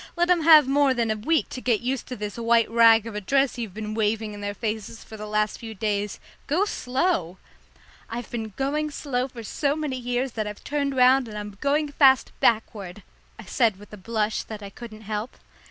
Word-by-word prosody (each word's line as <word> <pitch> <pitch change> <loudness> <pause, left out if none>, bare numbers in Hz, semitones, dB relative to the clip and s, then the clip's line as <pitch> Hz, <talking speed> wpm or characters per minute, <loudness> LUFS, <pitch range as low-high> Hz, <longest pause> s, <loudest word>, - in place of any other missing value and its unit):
Let 345 +1 +2
'em 350 -2 +4
have 310 -3 +7
more 275 -1 +3
than 230 -2 0
a - - 0
week 305 +10 0
to 255 - -7
get 235 -4 +1
used 255 +1 -2
to 250 - -5
this 210 -2 -5
white 230 -1 +3
rag 230 -1 +6
of 230 - -6
a 210 - -4
dress 270 +4 +1
you've 215 -5 -5
been 215 0 -5
waving 215 0 -1
in 205 - -9
their 205 0 -4
faces 220 0 -4
for 220 - -11
the 215 0 -7
last 210 0 0
few 225 -1 -8
days. 205 -1 -2 0.3
Go 340 +8 +2
slow!" 250 - -1 0.7
"I've 235 +1 -6
been 225 -2 -4
going 295 +3 -1
so 290 - -8
slow 250 +1 +1
for 245 -3 -10
so 280 +6 -1
many 300 -4 -3
years 245 +1 -2
that 215 -2 -3
I've 210 0 -8
turned 280 -2 -1
round 255 0 +5
and 210 -1 -7
I'm 205 -1 -7
going 290 +1 +1
fast 270 -3 +4
backward," 210 -4 0 0.3
I 220 - -10
said 220 +1 +1
with 205 +1 -15
a - - -8
blush 215 +1 -1
that 215 -2 -9
I 200 - -8
couldn't 220 -2 -10
help. 215 +3 -5
230 Hz, 220 wpm, -25 LUFS, 210-270 Hz, 0.7 s, have